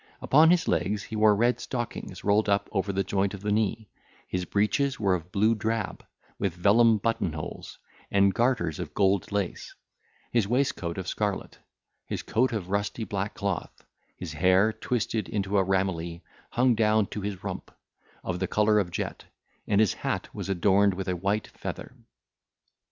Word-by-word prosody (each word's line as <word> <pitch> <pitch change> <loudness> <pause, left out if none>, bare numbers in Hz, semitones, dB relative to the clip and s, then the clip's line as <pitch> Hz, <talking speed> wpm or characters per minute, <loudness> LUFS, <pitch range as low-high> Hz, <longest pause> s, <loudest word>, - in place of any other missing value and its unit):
Upon 155 +4 +5
his 175 -1 +3
legs 100 +5 0
he 110 - -7
wore 105 -1 +5
red 120 +4 +2
stockings 120 -6 -5
rolled 105 +1 +3
up 100 0 +1
over 100 -1 0
the 95 0 0
joint 100 +1 0
of 95 - -10
the 105 0 -1
knee, 110 +1 0 0.4
his 90 -1 -2
breeches 125 - +1
were 100 -3 +2
of 90 0 -4
blue 110 +3 +3
drab, 110 0 -2 0.4
with 95 -4 -1
vellum 110 +5 +5
button 110 -5 -1
holes, 75 -1 -7 0.3
and 100 -1 +4
garters 115 - +1
of - - -6
gold 100 0 +2
lace, 100 -3 -3 0.6
his 115 -5 +2
waistcoat 120 -9 0
of 95 -1 -4
scarlet, 100 -1 -3 0.5
his - - -4
coat 125 +4 +1
of 100 -5 -4
rusty 100 +3 -1
black 100 0 -3
cloth, 100 -4 -4 0.3
his 85 -4 -6
hair, 95 +7 +3
twisted 110 -4 -2
into 100 -1 0
a - - +3
ramilie, 90 -3 -1 0.3
hung 125 0 +3
down 110 -1 +3
to 105 - -6
his 100 -2 -5
rump, - - -5 0.5
of 90 -1 -3
the 95 - -1
colour 105 +2 +3
of 95 -4 -1
jet, 85 - -4 0.4
and 100 -1 +3
his 110 -3 +4
hat - - -3
was - - -5
adorned 95 +1 +3
with 95 +1 -5
a 90 - 0
white 100 +4 -1
feather. - - -7
100 Hz, 170 wpm, -27 LUFS, 95-110 Hz, 0.6 s, Upon